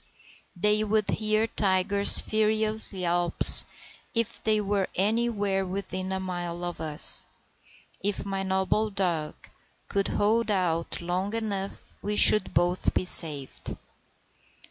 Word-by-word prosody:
They 210 Hz, +4 st, +1 dB
would 215 Hz, -1 st, 0 dB
hear 215 Hz, 0 st, 0 dB
Tiger's 200 Hz, -1 st, +3 dB
furious 215 Hz, 0 st, +1 dB
yelps 175 Hz, -3 st, +4 dB, 0.5 s
if 230 Hz, -1 st, -2 dB
they 215 Hz, -1 st, +1 dB
were 200 Hz, -2 st, -1 dB
anywhere 205 Hz, -1 st, 0 dB
within 190 Hz, 0 st, -5 dB
a 190 Hz, -, -3 dB
mile 175 Hz, -2 st, -6 dB
of 175 Hz, 0 st, -6 dB
us. 155 Hz, -2 st, +1 dB, 0.7 s
If 200 Hz, 0 st, -3 dB
my 195 Hz, -1 st, -4 dB
noble 190 Hz, +3 st, -1 dB
dog 175 Hz, -6 st, -2 dB, 0.5 s
could 200 Hz, 0 st, -1 dB
hold 225 Hz, +3 st, 0 dB
out 175 Hz, -5 st, -1 dB
long 185 Hz, +5 st, -3 dB
enough 200 Hz, -3 st, -6 dB
we 210 Hz, 0 st, -3 dB
should 215 Hz, 0 st, +5 dB
both 175 Hz, +1 st, 0 dB
be -, -, 0 dB
saved. 150 Hz, -6 st, +1 dB
195 Hz, 120 wpm, -26 LUFS, 180-215 Hz, 0.7 s, should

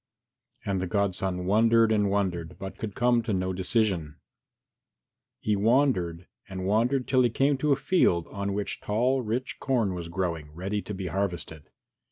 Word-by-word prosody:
And 95 Hz, -2 st, -1 dB
the 95 Hz, -, -2 dB
godson 95 Hz, -1 st, -1 dB
wondered 115 Hz, +3 st, +4 dB
and 105 Hz, -2 st, +2 dB
wondered, 90 Hz, -5 st, -1 dB
but 95 Hz, 0 st, -8 dB
could 105 Hz, -3 st, -5 dB
come 120 Hz, -1 st, +3 dB
to 110 Hz, -2 st, -2 dB
no 95 Hz, 0 st, -1 dB
decision. 95 Hz, -5 st, 0 dB, 1.2 s
He 105 Hz, -, 0 dB
wandered 100 Hz, -7 st, +2 dB, 0.2 s
and 95 Hz, -1 st, -5 dB
wandered 120 Hz, +6 st, +1 dB
till 130 Hz, -1 st, +3 dB
he 120 Hz, -, +4 dB
came 135 Hz, +5 st, +2 dB
to 150 Hz, +2 st, +1 dB
a -, -, +6 dB
field 135 Hz, -, +2 dB
on 100 Hz, 0 st, -3 dB
which 100 Hz, 0 st, -3 dB
tall 125 Hz, +5 st, +1 dB
rich 120 Hz, +3 st, -3 dB
corn 115 Hz, -8 st, +1 dB
was 85 Hz, -2 st, -5 dB
growing, 85 Hz, -4 st, -3 dB
ready 95 Hz, +5 st, -3 dB
to 105 Hz, -, -6 dB
be 95 Hz, 0 st, -5 dB
harvested. 90 Hz, -5 st, -3 dB
100 Hz, 165 wpm, -27 LUFS, 90-115 Hz, 1.2 s, a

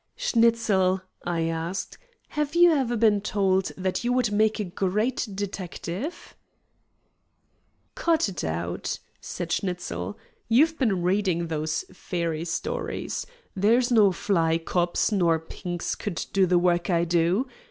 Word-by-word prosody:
"Schnitzel," 225 Hz, -, +2 dB, 0.2 s
I 175 Hz, -1 st, -1 dB
asked, 165 Hz, +3 st, -3 dB, 0.3 s
"have 300 Hz, +1 st, -2 dB
you 350 Hz, 0 st, +7 dB
ever 260 Hz, -6 st, +1 dB
been 210 Hz, -2 st, +4 dB
told 190 Hz, -2 st, +1 dB
that 185 Hz, +3 st, -2 dB
you 240 Hz, -, +1 dB
would 250 Hz, -4 st, +2 dB
make 215 Hz, +1 st, +2 dB
a -, -, 0 dB
great 205 Hz, +7 st, -1 dB
detective?" 195 Hz, -, -5 dB, 1.6 s
"Cut 335 Hz, -, +2 dB
it 185 Hz, -5 st, -5 dB
out," 85 Hz, +2 st, -3 dB, 0.2 s
said 175 Hz, -1 st, -5 dB
Schnitzel. 140 Hz, -, -3 dB, 0.3 s
"You've 310 Hz, +8 st, +4 dB
been 200 Hz, -9 st, +1 dB
reading 180 Hz, -3 st, +1 dB
those 155 Hz, 0 st, -2 dB
fairy 170 Hz, -2 st, -3 dB
stories. 475 Hz, -, -3 dB, 0.3 s
There's 230 Hz, +6 st, +3 dB
no 215 Hz, -4 st, +6 dB
fly 165 Hz, -3 st, +1 dB
cops 175 Hz, +4 st, 0 dB
nor 175 Hz, -5 st, +3 dB
Pinks 175 Hz, +2 st, -5 dB
could 205 Hz, -6 st, -4 dB
do 195 Hz, -1 st, +4 dB
the 180 Hz, 0 st, +4 dB
work 175 Hz, 0 st, +2 dB
I 170 Hz, -2 st, +3 dB
do. 175 Hz, +8 st, +2 dB
190 Hz, 130 wpm, -26 LUFS, 170-230 Hz, 1.6 s, you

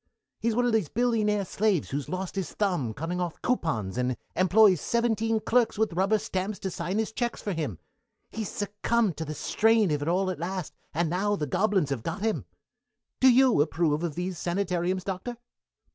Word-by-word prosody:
He's 230 Hz, -1 st, 0 dB
one 245 Hz, +1 st, +2 dB
of 240 Hz, -, +1 dB
these 210 Hz, -9 st, +1 dB
billionaire 215 Hz, -4 st, +1 dB
slaves 200 Hz, -5 st, 0 dB
who's 140 Hz, 0 st, -3 dB
lost 185 Hz, +1 st, -4 dB
his 195 Hz, -3 st, -3 dB
thumb 175 Hz, -, 0 dB
cutting 165 Hz, +9 st, -3 dB
off 175 Hz, -3 st, -3 dB
coupons 125 Hz, -, -1 dB
and 125 Hz, 0 st, 0 dB, 0.2 s
employs 185 Hz, -1 st, +5 dB
seventeen 225 Hz, -1 st, +1 dB
clerks 235 Hz, 0 st, +2 dB
with 220 Hz, -4 st, +1 dB
rubber 195 Hz, +5 st, +2 dB
stamps 205 Hz, -1 st, -3 dB
to 190 Hz, -, -3 dB
sign 175 Hz, +4 st, -3 dB
his 220 Hz, 0 st, 0 dB
checks 235 Hz, +1 st, -2 dB
for 205 Hz, -, -3 dB
him. 150 Hz, -, -3 dB, 0.5 s
He's 220 Hz, -2 st, -4 dB
succumbed 210 Hz, -2 st, 0 dB
to 160 Hz, -, -3 dB
the 155 Hz, 0 st, -5 dB
strain 220 Hz, +2 st, +3 dB
of 145 Hz, -1 st, 0 dB
it 145 Hz, -, -3 dB
all 185 Hz, +2 st, +1 dB
at 185 Hz, -, -6 dB
last, 180 Hz, -1 st, -4 dB, 0.2 s
and 170 Hz, +2 st, 0 dB
now 195 Hz, +5 st, 0 dB
the 155 Hz, -, -2 dB
gobelins 180 Hz, 0 st, +1 dB
have 130 Hz, -5 st, -1 dB
got 195 Hz, -, -4 dB
him. 220 Hz, -1 st, 0 dB, 0.7 s
Do 260 Hz, -1 st, +7 dB
you 250 Hz, -, +5 dB
approve 155 Hz, 0 st, +1 dB
of 165 Hz, -4 st, -2 dB
these 180 Hz, -1 st, -3 dB
sanitariums, 180 Hz, 0 st, -1 dB
Doctor?" 195 Hz, +6 st, -4 dB
190 Hz, 190 wpm, -27 LUFS, 170-220 Hz, 0.7 s, Do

